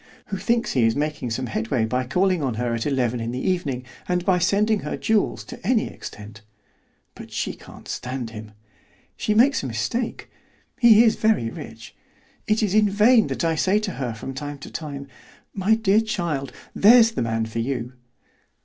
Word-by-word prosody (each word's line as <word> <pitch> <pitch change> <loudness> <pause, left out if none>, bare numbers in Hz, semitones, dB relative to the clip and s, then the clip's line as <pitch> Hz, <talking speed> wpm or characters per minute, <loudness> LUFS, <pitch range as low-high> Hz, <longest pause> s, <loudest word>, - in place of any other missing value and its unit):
who 195 - -2
thinks 235 +4 0
he 125 - +2
is 115 0 +3
making 150 -3 -2
some 125 +3 -2
headway 110 +1 -1
by 125 +3 -1
calling 180 +6 +1
on 130 -5 -1
her 120 +1 -1
at 115 +2 -2
eleven 125 -4 0
in 115 0 -3
the 125 +7 -3
evening, 145 -9 -1 0.2
and 180 0 0
by 185 -2 +3
sending 205 +4 +2
her - - -4
jewels 220 -2 0
to - - -10
any 225 +3 +2
extent; 105 +1 -10 0.7
but - - -12
she - - -2
can't - - -14
stand 125 -2 -5
him. 105 -1 -9 0.6
She 210 - -1
makes 260 +5 +4
a 135 - -4
mistake; 125 - -3 0.5
he 230 -2 +7
is 225 - +3
very 215 - +1
rich. 115 0 -10 0.5
It 215 +1 +2
is 200 -3 0
in 210 -1 +4
vain 215 +3 +4
that - - -3
I 165 - +2
say 185 +6 +2
to 210 -2 -2
her 125 -8 -4
from 135 +5 -7
time 145 +1 -6
to - - -9
time, 140 -3 -6 0.5
'My 200 +3 +2
dear 220 -1 +3
child, 170 - -3 0.2
there's 225 +2 +6
the 225 - -3
man 115 -1 -1
for 110 +1 -5
you. 125 0 -3
150 Hz, 185 wpm, -23 LUFS, -, 0.7 s, he